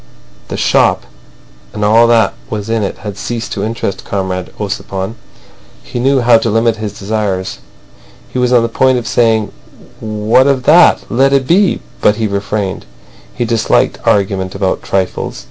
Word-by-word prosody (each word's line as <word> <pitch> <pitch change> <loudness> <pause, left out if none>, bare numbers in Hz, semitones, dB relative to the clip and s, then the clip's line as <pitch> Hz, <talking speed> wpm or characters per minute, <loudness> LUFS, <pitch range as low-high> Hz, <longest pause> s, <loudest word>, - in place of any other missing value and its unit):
The - - -5
shop - - +2 0.7
and 105 0 -2
all 115 +3 +5
that 115 -1 +3 0.2
was 110 0 -4
in 115 -1 0
it 100 - -3
had 105 -1 -6
ceased 115 -1 -4
to - - -3
interest 110 -3 -3
Comrade 95 -2 -3
Ossipon. 100 0 -4 0.7
He 120 - -6
knew 135 +1 +2
how 120 -1 +5
to 115 - -1
limit 115 +1 +1
his 105 -1 -6
desires. 100 -2 -3 0.7
He 130 - -4
was 125 0 +1
on 120 -2 +4
the - - +1
point 130 +2 +2
of 120 - -4
saying 110 -3 +1 0.5
"What 110 +3 +2
of 135 -2 +1
that? 160 +5 +5
Let 135 +3 +3
it 135 -1 +2
be," 185 +6 +2 0.2
but 105 - +4
he 110 0 -2
refrained. 100 -1 -3 0.5
He 120 - -1
disliked 115 -1 +1
argument 95 -2 0
about 95 -1 -1
trifles. 95 -1 -2
110 Hz, 160 wpm, -14 LUFS, 100-120 Hz, 0.7 s, all